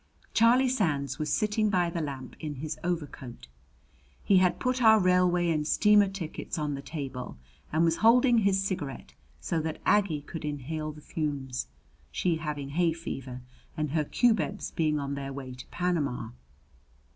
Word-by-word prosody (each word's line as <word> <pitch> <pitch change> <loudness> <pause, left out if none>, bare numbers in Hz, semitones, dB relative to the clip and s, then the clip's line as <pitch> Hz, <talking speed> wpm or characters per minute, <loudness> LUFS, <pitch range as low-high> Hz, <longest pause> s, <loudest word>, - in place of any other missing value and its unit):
Charlie 245 +4 +5
Sands 145 - 0
was 155 - -2
sitting 215 0 +1
by 180 -3 +1
the 170 - -2
lamp 135 -4 -6
in 150 -2 -5
his 150 +3 -5
overcoat. 145 - -4 0.8
He 195 - +4
had 180 -1 +3
put 255 0 0
our 220 -1 +7
railway 180 -2 +3
and 150 -2 0
steamer 210 +1 +5
tickets 190 -5 -5
on 150 -2 -1
the 140 - -5
table, 135 - -6 0.3
and 160 +2 +3
was 165 0 +2
holding 240 +1 +5
his 195 -2 +2
cigarette 180 -9 -4 0.3
so 160 - -1
that 160 0 -3
Aggie 195 -8 +2
could 165 +2 -7
inhale 150 +1 -4
the 150 0 -13
fumes, 140 -5 -3 0.4
she 175 -3 0
having 150 -3 -4
hay 165 +3 +1
fever 130 -6 -6 0.4
and 155 -2 -1
her 155 0 +1
cubebs 220 +3 +1
being 155 -2 +1
on 140 -1 -3
their 140 -1 -4
way 135 -2 -7
to 125 0 -11
Panama. 170 -8 -1
160 Hz, 160 wpm, -28 LUFS, 145-190 Hz, 0.8 s, our